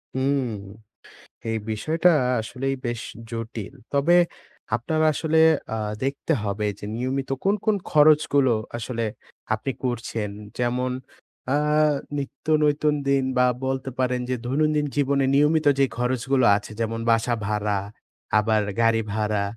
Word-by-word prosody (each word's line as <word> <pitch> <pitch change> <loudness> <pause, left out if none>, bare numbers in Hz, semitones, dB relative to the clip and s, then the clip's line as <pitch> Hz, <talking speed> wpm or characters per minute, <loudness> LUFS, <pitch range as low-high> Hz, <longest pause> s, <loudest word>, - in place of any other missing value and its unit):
হুম। 135 0 +1 1.0
এই 115 - 0
বিষয়টা 160 +11 +2 0.3
আসলেই 135 +4 -3
বেশ 120 -1 -2 0.3
জটিল। 115 -3 -6 0.2
তবে 150 +5 +4 0.6
আপনার 155 +7 -1
আসলে 160 +2 0 0.4
আ - - -2 0.3
দেখতে 140 +1 -1
হবে 105 +1 -2
যে, - - -7
নিয়মিত 130 +3 -2
কোন, 195 +2 +3
কোন 215 - +3 0.2
খরচগুলো 150 -3 +5 0.3
আসলে 115 0 -3 0.5
আপনি 110 +5 -2
করছেন। 115 -4 -2 0.3
যেমন 125 +1 0 0.6
আ - - +3 0.6
নিত্য 140 0 -6 0.2
নতুন 150 0 +2
দিন 135 -1 +3
বা, 125 - +5 0.2
বলতে 135 0 -2
পারেন 125 -1 +1
যে, 130 - +1
দৈনন্দিন 150 +3 +1
জীবনে 140 -1 +2
নিয়মিত 150 +2 +3
যে 135 - +6
খরচগুলো 130 +1 +1
আছে, 105 - -9
যেমন 115 0 -1
বাসা 115 +1 +2
ভাড়া, 105 -1 0 0.6
আবার 110 0 +2 0.2
গাড়ি 115 0 +3
ভাড়া, 105 -1 0
130 Hz, 125 wpm, -24 LUFS, 115-140 Hz, 1.0 s, যে